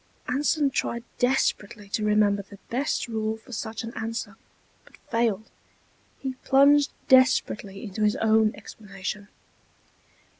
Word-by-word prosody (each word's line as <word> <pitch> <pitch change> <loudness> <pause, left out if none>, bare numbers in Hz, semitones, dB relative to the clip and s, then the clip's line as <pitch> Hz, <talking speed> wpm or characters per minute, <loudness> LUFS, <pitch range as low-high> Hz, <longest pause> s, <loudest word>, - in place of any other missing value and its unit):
Anson 285 +2 +1
tried 235 -2 -2 0.2
desperately 235 -4 0
to 215 - -1
remember 210 -1 +3
the 200 0 -14
best 265 +2 -1
rule 220 -1 -2
for 225 - -17
such 220 -1 -5
an 230 +1 -7
answer, 225 -1 -4 0.5
but - - -20
failed. 225 -2 0 0.7
He 265 -1 -4
plunged 280 +2 +5 0.2
desperately 255 -6 +3
into 215 -1 -6
his 210 0 +3
own 220 -1 +3
explanation. 200 -1 -7
220 Hz, 120 wpm, -26 LUFS, 210-250 Hz, 0.7 s, plunged